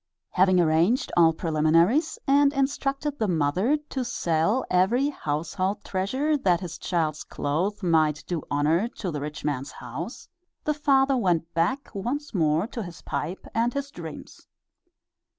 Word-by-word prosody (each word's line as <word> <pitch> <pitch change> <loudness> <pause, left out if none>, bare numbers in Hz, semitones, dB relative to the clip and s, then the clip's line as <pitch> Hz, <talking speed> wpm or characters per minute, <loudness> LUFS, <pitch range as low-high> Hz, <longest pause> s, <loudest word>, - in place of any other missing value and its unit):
Having 185 0 +4
arranged 170 +9 +2
all 165 -2 +6
preliminaries 165 - +2
and 280 0 +4
instructed 275 +1 -1
the 220 - +1
mother 180 - +1
to 265 - -2
sell 205 0 0
every 220 +10 +2
household 185 - -2
treasure 260 +11 0
that 180 -8 +2
his 170 -3 -6
child's 155 -3 -1
clothes 185 +9 -2
might 155 -3 +2
do 170 -3 -2
honor 155 +8 +2
to 185 -5 -3
the 150 -2 -4
rich 150 +1 -6
man's 140 -1 -2
house, 140 - -7 0.4
the 300 - +1
father 275 -2 +3
went 175 -8 0
back 175 - -1
once 250 +9 -3
more 160 -1 +2
to 230 +1 -6
his 175 -4 -9
pipe 160 +5 -4
and 235 +2 +1
his 280 0 -3
dreams. 160 -3 -10
185 Hz, 145 wpm, -26 LUFS, 160-260 Hz, 0.4 s, all